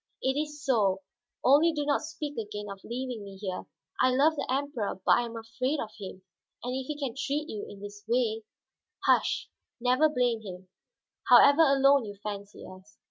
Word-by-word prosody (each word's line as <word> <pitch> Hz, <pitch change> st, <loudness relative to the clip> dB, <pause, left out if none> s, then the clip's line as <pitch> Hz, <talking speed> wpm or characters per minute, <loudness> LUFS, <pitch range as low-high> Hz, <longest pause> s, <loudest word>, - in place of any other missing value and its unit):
"It 265 Hz, -, +2 dB
is 295 Hz, 0 st, -4 dB
so, 200 Hz, -7 st, +2 dB, 0.4 s
only 300 Hz, +5 st, +5 dB
do 295 Hz, -1 st, -2 dB
not 285 Hz, -1 st, +1 dB
speak 305 Hz, -2 st, -6 dB
again 210 Hz, -2 st, -5 dB
of 195 Hz, -1 st, -10 dB
leaving 245 Hz, -2 st, -5 dB
me 195 Hz, -1 st, -10 dB
here. 190 Hz, -2 st, -5 dB, 0.3 s
I 255 Hz, -, +5 dB
love 285 Hz, +5 st, +3 dB
the -, -, -3 dB
Emperor, 265 Hz, -8 st, -2 dB
but -, -, +4 dB
I -, -, +6 dB
am 230 Hz, -1 st, -7 dB
afraid 255 Hz, +6 st, -2 dB
of 215 Hz, -, -4 dB
him. 190 Hz, -1 st, -8 dB, 0.4 s
And 250 Hz, +1 st, -3 dB
if 260 Hz, 0 st, -4 dB
he 300 Hz, -, -4 dB
can 275 Hz, -5 st, -3 dB
treat 285 Hz, +3 st, -2 dB
you 210 Hz, -7 st, -6 dB
in 200 Hz, -, -11 dB
this 205 Hz, 0 st, -9 dB
way 225 Hz, -2 st, +1 dB, 0.3 s
" -, -, -17 dB
"Hush; -, -, +2 dB, 0.3 s
never 255 Hz, +6 st, +3 dB
blame 245 Hz, -5 st, +1 dB
him, 185 Hz, -3 st, -9 dB, 0.6 s
however 285 Hz, +3 st, +8 dB
alone 275 Hz, -3 st, +5 dB
you 205 Hz, -1 st, -7 dB
fancy 205 Hz, 0 st, -7 dB
us. 185 Hz, +2 st, -14 dB
245 Hz, 190 wpm, -29 LUFS, 205-280 Hz, 0.6 s, however